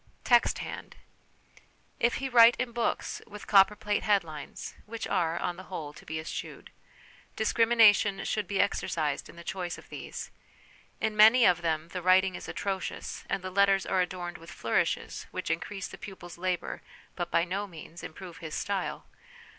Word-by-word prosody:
Text 240 -1 +4
hand. - - -7 1.0
If 235 +1 +2
he 270 - -2
write 240 -2 +7
in 250 -1 -2
books 235 0 -2
with 210 -2 -10
copperplate 205 +1 +4
headlines 165 -8 -1
(which 230 +1 -5
are, 170 -3 +1
on 175 - -2
the 185 - -9
whole, 155 -6 -6
to - - -14
be 160 +1 -3
eschewed), 160 - -7 0.6
discrimination 220 -3 +4
should 210 - -1
be 200 -2 -1
exercised 155 -7 0
in - - -13
the 170 - -10
choice 175 -1 -4
of - - -15
these; - - -7 0.7
in 220 -1 -1
many 225 +3 +8
of 175 -1 +4
them 160 -1 -1
the 180 - -5
writing 185 +1 +4
is - - -7
atrocious, 190 -4 -4
and 190 - -1
the 185 - -5
letters 195 0 +3
are 190 - +2
adorned 180 -1 -4
with 165 +1 -13
flourishes - - -1
which - - -3
increase 195 -2 -3
the - - -11
pupil's 175 -3 -10
labour 185 -1 -2 0.3
but 175 -1 -3
by 170 - +3
no 195 +3 -3
means 170 -1 -11
improve 175 +1 -9
his 160 -3 -6
style. 195 -2 -2
190 Hz, 165 wpm, -29 LUFS, 175-210 Hz, 1.0 s, many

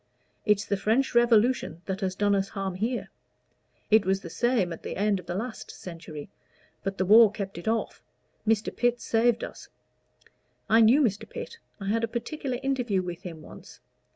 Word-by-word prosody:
"It's 210 0 +3
the 200 - 0
French 230 +7 +1
Revolution 235 -7 +3
that 190 +1 -3
has 185 -1 -1
done 205 +1 +2
us 195 0 +1
harm 195 -2 -3
here. 225 +7 -2 0.8
It 215 -1 +6
was 190 0 0
the 170 - -9
same 235 -8 +1
at - - -10
the - - -5
end 205 0 +1
of 180 - -13
the 175 - -3
last 225 +4 -5
century, 165 -4 -9 0.5
but 195 0 -3
the 190 - +1
war 220 +3 +8
kept 200 -4 -5
it 175 - -10
off 225 +1 -1 0.5
Mr. 220 -1 +1
Pitt 245 0 +1
saved 230 0 +2
us. - - -8 1.0
I 225 +1 +5
knew 245 +7 +6
Mr. 205 -5 -1
Pitt. 465 - -7 0.2
I 195 -1 -4
had 230 +2 +1
a - - +2
particular 250 +3 -4
interview 245 -8 0
with 175 -1 -6
him 165 -5 -8
once. - - -13
210 Hz, 180 wpm, -27 LUFS, 190-235 Hz, 1.0 s, war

